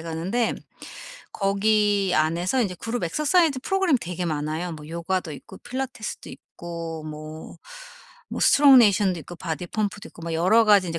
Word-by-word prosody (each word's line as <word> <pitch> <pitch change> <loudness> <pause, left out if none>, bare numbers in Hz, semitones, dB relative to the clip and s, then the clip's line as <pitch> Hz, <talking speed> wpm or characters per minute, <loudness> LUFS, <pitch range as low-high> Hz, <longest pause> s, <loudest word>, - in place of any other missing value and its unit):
가는데 170 +9 -1 0.8
거기 200 -1 +1
안에서 170 +10 +1
인제 185 -4 -2
그룹 230 -1 -3
엑서사이즈 305 - +2
프로그램 385 -6 +2
되게 180 +1 -4
많아요. 155 +2 -3
뭐 155 -1 -10
요가도 170 0 -3
있고 140 - -11
필라테스도 255 -3 -6
있고 165 -2 -8
뭐 155 +1 -9 0.7
뭐 - - -4
스트롱네이션도 215 - +5
있고 175 +4 -10
바디 165 +2 -4
펌프도 210 0 -3
있고 - - -15
뭐 165 0 -4
여러 200 +8 +4
가지 205 -3 +5
인제 165 0 -3
185 Hz, 350 characters per minute, -24 LUFS, 165-220 Hz, 0.8 s, 스트롱네이션도